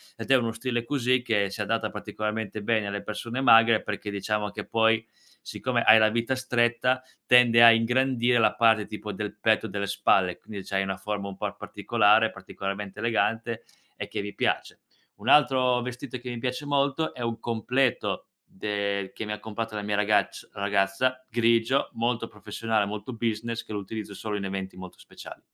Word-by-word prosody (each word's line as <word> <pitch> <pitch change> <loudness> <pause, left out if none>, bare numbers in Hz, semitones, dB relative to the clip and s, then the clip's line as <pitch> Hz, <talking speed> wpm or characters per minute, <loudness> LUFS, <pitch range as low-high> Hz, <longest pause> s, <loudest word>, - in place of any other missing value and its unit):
ed - - -8
è 135 - +6
uno 115 -3 +1
stile 120 +1 -3
così 125 -1 +1
che 105 -5 +1
si 100 +2 -5
adatta 110 +1 -1
particolarmente 110 -1 -4
bene 110 -1 +1
alle 100 0 -3
persone 115 +4 -4
magre 115 -3 +6
perché, 105 - -5
diciamo, 105 +1 -2
che - - -6
poi 115 0 +2 0.4
siccome - - -2
hai 110 - +8
la 110 0 +5
vita 115 +3 -1
stretta 125 0 +1 0.2
tende 120 -1 +6
a 115 - +10
ingrandire 120 +1 +2
la 115 - +3
parte 110 -3 +3
tipo 105 0 -7
del 105 +2 -5
petto, 110 0 +2
delle 100 -1 -3
spalle, 95 -2 +2
quindi 100 -3 -9
c'hai 95 0 0
una 95 0 -3
forma 100 0 -4
un 95 - -9
po' - - -3
particolare, - - +2
particolarmente 100 +1 -6
elegante 115 0 -1 0.3
e - - -6
che - - -4
mi 100 0 -7
piace. - - -1 0.3
Un 105 +4 -11
altro 130 -3 +4
vestito 125 +1 -6
che 125 +1 -8
mi 120 - -5
piace 125 +4 -3
molto 145 +2 0
è 125 - -8
un 115 -1 -3
completo 120 +3 -1 0.2
del 100 -1 -3
che 110 - -6
mi 105 - -5
ha 105 - -4
comprato 110 0 -5
la 105 - -3
mia 105 0 -2
ragacc 105 -1 0
ragazza, 100 +6 0
grigio, 115 +2 +2
molto 115 0 -1
professionale, 110 -3 -2
molto 105 +5 -6
business, 115 0 -3
che 110 - -9
lo 105 - -2
utilizzo 105 +1 -7
solo 105 +1 -4
in 100 - -4
eventi 95 -1 -5
molto 95 -1 -10
speciali. - - -12
115 Hz, 180 wpm, -26 LUFS, 105-120 Hz, 0.4 s, a